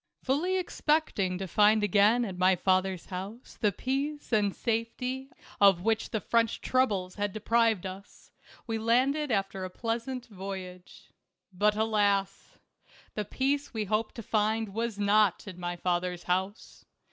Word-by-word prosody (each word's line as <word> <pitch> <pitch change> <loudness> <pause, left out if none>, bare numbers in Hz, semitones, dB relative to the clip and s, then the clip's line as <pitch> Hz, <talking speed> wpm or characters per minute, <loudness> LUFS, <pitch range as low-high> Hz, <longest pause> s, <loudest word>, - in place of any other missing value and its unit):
Fully 330 +8 +1
expecting 300 - 0
to 190 +1 -4
find 210 +4 +4
again 210 +4 +4
at 190 -4 -5
my 185 +1 +4
father's 185 0 +1
house 195 +6 -8
the 210 -3 +3
peace 275 +5 -3
and 205 -2 +2
safety 250 +3 -2 0.3
of 195 -3 +6
which 225 +1 0
the 220 - -1
French 230 +2 +1
troubles 205 -8 0
had 205 -1 -2
deprived 220 -1 +1
us, 190 +2 -10 0.3
we 225 -2 -2
landed 265 +6 +2
after 195 -3 -1
a 185 - -4
pleas 230 +4 -3
ant 255 -2 -5
voyage. 190 -3 -9 0.4
But, 210 +3 +2
alas! 205 -3 0 0.6
the 210 - -3
peace 275 +4 -1
we 215 -1 -1
hoped 215 +2 -1
to 230 - -7
find 220 +1 0
was 225 -1 -2
not 205 -1 +2
in 185 -3 -8
my 175 0 -3
father's 175 0 -2
house. 190 +4 -3
210 Hz, 145 wpm, -29 LUFS, 190-235 Hz, 0.6 s, of